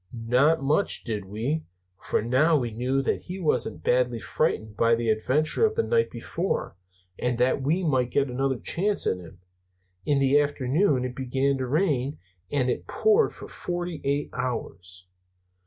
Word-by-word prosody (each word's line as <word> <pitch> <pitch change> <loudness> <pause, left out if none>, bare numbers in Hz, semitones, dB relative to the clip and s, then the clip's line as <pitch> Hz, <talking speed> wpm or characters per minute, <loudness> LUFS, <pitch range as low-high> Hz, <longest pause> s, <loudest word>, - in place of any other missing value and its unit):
"Not 140 +6 +3
much, 150 +8 +1
did 105 -4 -4
we! 115 +11 -2 0.4
For - - 0
now 145 +7 +3
we 120 -4 -2
knew 130 +5 -1
that - - 0
he 185 +2 -6
wasn't 160 -5 -1
badly 125 -1 +2
frightened 110 -1 -1
by 115 +1 +3
the 115 0 -1
adventure 145 - +1
of 440 -1 +3
the 460 - +2
night 465 -1 +2
before, 170 - -3 0.4
and 125 -1 0
that 125 +3 +2
we 160 +7 +1
might 130 -6 +1
get 140 +2 +1
another 135 +1 -1
chance 200 - 0
at 95 - +1
him. 90 0 -13 0.6
In 145 - +1
the 140 +1 +4
afternoon 145 0 +1
it 125 0 -5
began 135 +1 0
to 130 - -2
rain; 145 -2 0 0.3
and 135 -3 +1
it 125 - -2
poured 435 +1 +3
for - - -10
forty 175 -2 -5
eight 140 +1 -1
hours. 90 -7 -5
135 Hz, 165 wpm, -26 LUFS, 120-155 Hz, 0.6 s, the